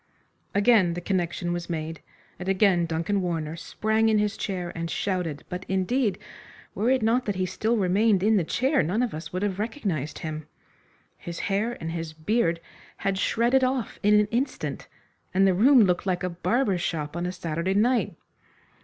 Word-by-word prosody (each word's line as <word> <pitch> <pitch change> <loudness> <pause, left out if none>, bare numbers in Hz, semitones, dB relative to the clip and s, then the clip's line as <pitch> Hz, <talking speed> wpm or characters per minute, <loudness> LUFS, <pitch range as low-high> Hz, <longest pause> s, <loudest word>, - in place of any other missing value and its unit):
Again 200 -5 +4
the - - -3
connection 175 -1 -1
was 175 0 -4
made, 160 -1 -4 0.4
and 180 +1 -4
again 190 -3 +3
Duncan 165 +5 -1
Warner 165 -3 -2
sprang 220 +6 0
in 215 - +3
his 210 0 +1
chair 180 -3 -3
and 165 0 -3
shouted, 180 -7 -2
but, 180 +1 -5
indeed, 195 +2 +1 0.6
were 225 +4 0
it 260 -3 +2
not 235 +3 +2
that 205 - -1
he 185 0 0
still 220 +6 0
remained 195 +1 +3
in 220 +1 +4
the 190 - +3
chair 265 - +1
none 185 +9 0
of 245 - -2
us 155 +1 -7
would 185 +2 -2
have 200 -2 -1
recognised 200 - -3
him. 155 -1 -6 0.7
His 170 -1 -7 0.2
hair 220 +5 0
and 165 - -4
his 165 -1 -5
beard 170 +1 0 0.5
had 195 -1 +1
shredded 240 +6 +2
off 255 -3 -1
in 210 +1 +5
an 210 - +3
instant, 250 +4 -2 0.5
and 195 +1 +5
the 190 - +4
room 245 +6 +6
looked 180 0 +1
like 180 -1 0
a 180 - -1
barber's 195 +1 0
shop 150 -3 -3
on 175 +1 -2
a - - -2
Saturday 175 +1 -2
night. 240 +4 +2
190 Hz, 180 wpm, -26 LUFS, 170-220 Hz, 0.7 s, room